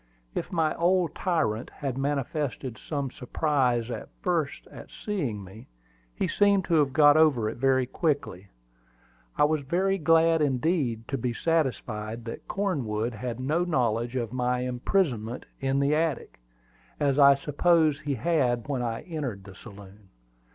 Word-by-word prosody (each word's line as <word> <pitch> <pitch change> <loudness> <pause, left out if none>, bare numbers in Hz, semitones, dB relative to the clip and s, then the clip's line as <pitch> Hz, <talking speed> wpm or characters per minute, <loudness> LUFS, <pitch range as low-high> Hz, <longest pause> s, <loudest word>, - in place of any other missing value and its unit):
If - - -4
my 160 -3 +1
old 175 -1 +2
tyrant 130 - -1
had 135 -3 -5
manifested 140 -2 -2
some 140 -4 -3
surprise 125 -3 0
at - - -6
first 165 -6 -1
at - - -11
seeing 140 - -3
me, 95 +4 -13 0.5
he - - -1
seemed 200 -2 +3
to - - -2
have 140 -3 +2
got 145 +1 +6
over 145 -9 +4
it - - -4
very 130 0 +2
quickly. 130 - -2 0.9
I - - +4
was 150 0 +2
very 190 +7 0
glad 165 0 +4
indeed 130 -5 0
to 135 - -2
be 120 0 -1
satisfied 115 -7 -2
that 115 - -7
Cornwood 125 - -1
had 115 +2 -5
no 150 +7 0
knowledge 120 -7 0
of 120 -2 -2
my 125 0 0
imprisonment 125 - -1
in 135 0 0
the 140 +1 +2
attic, 155 - -1 0.6
as 140 -1 +1
I 140 0 +8
supposed 155 +1 +2
he 145 -2 -2
had 125 -3 0
when 135 -4 -1
I 115 -2 -3
entered 140 - -5
the 95 -1 -12
saloon. 100 -1 -14
135 Hz, 150 wpm, -27 LUFS, 120-155 Hz, 0.9 s, I